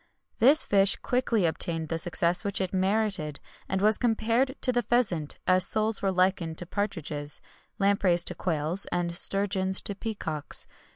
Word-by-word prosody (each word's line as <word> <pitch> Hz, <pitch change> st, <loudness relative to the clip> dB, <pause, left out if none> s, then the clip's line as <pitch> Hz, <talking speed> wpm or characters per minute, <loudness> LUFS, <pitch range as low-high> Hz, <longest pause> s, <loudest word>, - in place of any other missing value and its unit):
This 275 Hz, +7 st, +6 dB
fish 195 Hz, -1 st, +4 dB
quickly 245 Hz, -6 st, 0 dB
obtained 165 Hz, -1 st, -1 dB
the 165 Hz, -, -2 dB
success 175 Hz, +1 st, +1 dB
which 200 Hz, -2 st, -1 dB
it 190 Hz, -1 st, -3 dB
merited, 190 Hz, -6 st, 0 dB, 0.3 s
and 190 Hz, +1 st, -1 dB
was 215 Hz, 0 st, +4 dB
compared 235 Hz, +3 st, +1 dB
to 255 Hz, -, +2 dB
the 245 Hz, -1 st, +1 dB
pheasant, 200 Hz, -10 st, 0 dB
as 185 Hz, 0 st, +4 dB
soles 215 Hz, 0 st, -1 dB
were 195 Hz, -, +1 dB
likened 180 Hz, -3 st, 0 dB
to 175 Hz, -, -4 dB
partridges, 160 Hz, -7 st, -3 dB, 0.4 s
lampreys 195 Hz, -3 st, +2 dB
to -, -, -5 dB
quails, 165 Hz, +2 st, -2 dB
and 175 Hz, -1 st, -1 dB
sturgeons 190 Hz, +1 st, +1 dB
to 200 Hz, -, -4 dB
peacocks. 190 Hz, -9 st, -3 dB
190 Hz, 155 wpm, -27 LUFS, 170-215 Hz, 0.4 s, This